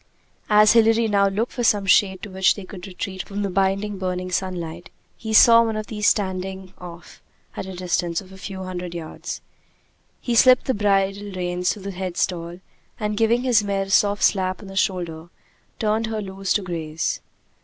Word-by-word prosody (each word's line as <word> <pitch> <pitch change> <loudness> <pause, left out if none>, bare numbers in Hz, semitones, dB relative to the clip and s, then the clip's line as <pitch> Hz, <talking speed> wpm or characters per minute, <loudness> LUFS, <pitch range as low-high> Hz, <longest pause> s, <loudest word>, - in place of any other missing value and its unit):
As 210 0 +6
Hilary 225 0 +4
now 200 -2 +3
looked 210 +5 -1
for 245 - -3
some 205 -3 +3
shade 190 -1 +3
to 210 - -7
which 190 0 +3
they 200 - -8
could 185 -1 -9
retreat 190 0 -5
from 205 +1 -5
the 200 - -2
blinding, 195 +2 0
burning 185 -1 -3
sunlight, 175 -2 -4 0.3
he 220 - -6
saw 230 +1 +8
one 225 -1 -2
of 215 - -4
these 210 -1 -1
standing 190 -1 -1
off 175 -1 -11 0.3
at - - -5
a 190 - -7
distance 175 -1 -1
of 190 -1 -13
a 190 - -12
few 190 -1 -6
hundred 180 -1 -6
yards. 165 -2 -6 0.8
He 240 - -2
slipped 255 +2 +6
the 260 - +1
bridle 200 -1 0
reins 180 0 -1
through 205 - -7
the 200 - -4
head 185 -2 -5
stall, 175 0 -2 0.4
and 210 -1 -2
giving 230 +3 +2
his 240 -5 +3
mare 200 -1 -1
a 195 - -9
soft 205 0 +3
slap 185 -2 +2
on 195 - -10
the 195 - -9
shoulder, 175 -3 -2 0.5
turned 220 +1 0
her 220 -1 -3
loose 195 -1 -5
to 205 - 0
graze. 165 -3 -3
195 Hz, 190 wpm, -22 LUFS, 185-210 Hz, 0.8 s, saw